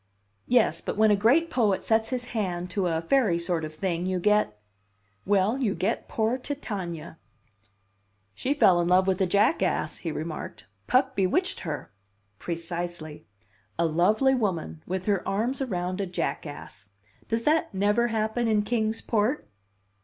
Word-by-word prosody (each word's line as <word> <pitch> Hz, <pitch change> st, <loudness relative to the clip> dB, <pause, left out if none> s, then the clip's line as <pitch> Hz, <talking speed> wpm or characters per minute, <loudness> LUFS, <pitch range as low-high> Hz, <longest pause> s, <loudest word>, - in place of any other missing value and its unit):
"Yes, 245 Hz, -2 st, +3 dB
but -, -, -4 dB
when 215 Hz, 0 st, +5 dB
a -, -, +5 dB
great 275 Hz, +12 st, +3 dB
poet 210 Hz, -6 st, +1 dB
sets 220 Hz, 0 st, +2 dB
his 250 Hz, -1 st, -2 dB
hand 180 Hz, -5 st, -2 dB
to 195 Hz, -2 st, 0 dB
a 165 Hz, -1 st, 0 dB
fairy 205 Hz, -2 st, +3 dB
sort 170 Hz, -1 st, -1 dB
of 155 Hz, -, -4 dB
thing, 175 Hz, +2 st, -2 dB
you 185 Hz, -1 st, 0 dB
get 210 Hz, -, +2 dB, 0.7 s
well, 205 Hz, +5 st, +2 dB
you 220 Hz, -7 st, 0 dB
get 215 Hz, +5 st, -1 dB
poor 225 Hz, +3 st, 0 dB
Titania." 185 Hz, -, -5 dB, 1.1 s
"She 275 Hz, -, -1 dB
fell 185 Hz, -11 st, +5 dB
in 170 Hz, -, 0 dB
love 185 Hz, +1 st, +4 dB
with 190 Hz, 0 st, 0 dB
a 190 Hz, -, +3 dB
jackass," 205 Hz, -, +1 dB
he -, -, -4 dB
remarked. -, -, -6 dB, 0.2 s
"Puck 260 Hz, +1 st, +2 dB
bewitched 195 Hz, -, +1 dB
her." 150 Hz, -, -5 dB, 0.5 s
"Precisely. 170 Hz, -2 st, -5 dB, 0.5 s
A 170 Hz, -, +2 dB
lovely 205 Hz, -, +3 dB
woman 175 Hz, -, -2 dB
with 185 Hz, 0 st, -3 dB
her 200 Hz, -3 st, +1 dB
arms 225 Hz, +8 st, -1 dB
around 185 Hz, -5 st, -2 dB
a 195 Hz, -, -2 dB
jackass. 145 Hz, -, -5 dB, 0.4 s
Does 230 Hz, +1 st, -1 dB
that 310 Hz, +4 st, +2 dB
never 205 Hz, +5 st, +2 dB
happen 225 Hz, +1 st, -1 dB
in 215 Hz, -2 st, +2 dB
Kings 220 Hz, 0 st, -1 dB
Port?" 230 Hz, +6 st, 0 dB
200 Hz, 155 wpm, -26 LUFS, 175-230 Hz, 1.1 s, when